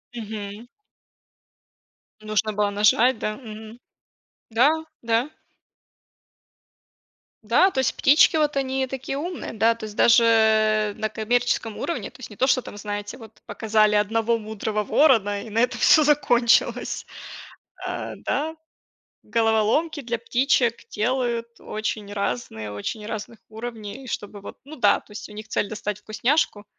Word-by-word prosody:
Мгм. 215 0 -7 1.5
Нужно 215 0 -1
было 205 0 +1
нажать, 215 +5 +3
да 215 -1 -2
мгм. 220 -1 -10 0.7
Да, 235 +5 +4 0.3
да. 230 +4 0 2.1
Да, 240 - +4
то 265 - -2
есть 260 - 0
птички 295 +3 +5
вот 300 -2 +1
они 265 -1 -1
такие 265 +1 -5
умные, 345 +4 -5
да, 225 +1 +2
то 230 - -12
есть 210 -1 -10
даже, 235 0 +6
э, 215 -2 +3
на 215 +1 -3
коммерческом 225 0 -1
уровне, 340 - -3
то - - -19
есть - - -8
не 210 - -13
то, 260 - +2
что 255 -1 +3
там, 205 - -10
знаете, 205 +2 -5
вот 225 -3 -13
показали 215 -1 +2
1 225 +2 +1
мудрого 215 -1 -3
ворона 205 -9 +3
и 225 - -10
на 220 +2 -1
этом 245 +1 +1
всё 310 - +6
закончилось. 245 -5 +2 0.8
А, - - -4
да, 315 +3 -2 0.7
головоломки 230 +8 +1
для 235 -2 -3
птичек 240 0 +1
делают 235 0 -2
очень 215 -1 -4
разные, 120 - -3
очень 105 - -5
разных 220 +1 -6
уровней, 225 +2 -8
чтобы 205 -2 -6
вот, 200 - -10
ну 305 +3 -10
да, 210 -8 +3
то - - -22
есть 210 +1 -8
у - - -12
них 215 +1 -9
цель 210 - -1
достать 210 -1 -4
вкусняшку 215 -1 0
225 Hz, 140 wpm, -24 LUFS, 210-245 Hz, 2.1 s, даже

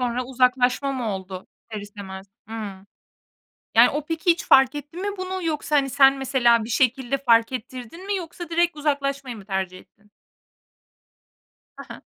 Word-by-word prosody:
Sonra 245 0 -1
uzaklaşma 255 +1 +1
mı 250 -4 -3
oldu 190 -1 -8 0.2
ister 215 -2 -5
istemez? 200 -2 -9 0.2
Hımm. 205 -3 -7 0.9
Yani, - - +7
o 295 0 -3
peki 325 +3 0
hiç 340 - +1
fark 265 +1 +6
etti 290 +3 -8
mi 395 +3 -3
bunu 370 0 -4
yoksa, 305 -1 0
hani, 275 -1 +1
sen 270 +1 +5
mesela 240 -4 +3
bir 225 - -8
şekilde 260 +2 +1
fark 230 -3 +3
ettirdin 255 - -7
mi? 405 - 0
Yoksa 345 -1 -7
direkt 345 0 +1
uzaklaşmayı 275 -4 -2
mı 200 - -12
tercih 190 -2 -3
ettin? 210 +2 -23 1.7
Ha - - -9
ha. - - -10
260 Hz, 160 wpm, -23 LUFS, 220-295 Hz, 1.7 s, Yani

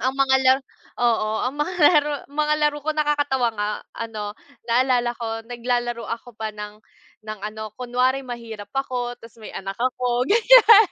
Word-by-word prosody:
ang 260 +3 0
mga 270 -1 +4
laro, 260 +1 +5 0.4
oo, 225 -3 +2 0.2
ang - - -14
mga 345 +5 -1
laro 295 -1 +5 0.2
mga 300 +1 +1
raro 300 - -4
laro 295 0 +2
ko 310 - 0
nakakatawa 290 -4 +1
nga 210 0 0 0.3
ano, 215 -3 -5 0.4
naalala 245 0 +3
ko 230 -2 -4 0.2
naglalaro 240 -1 -2
ako 230 0 -6
pa 220 0 -3
ng, 210 0 -8 0.5
ng 215 0 -6
ano 215 0 -6
kunwari 255 +2 0
mahirap 230 -5 -8
ako, 245 -2 -2
'tas 230 -1 -15
may - - -8
anak 195 0 -5
ako 250 0 0
ganyan, 455 0 +8
245 Hz, 165 wpm, -23 LUFS, 225-275 Hz, 0.5 s, ganyan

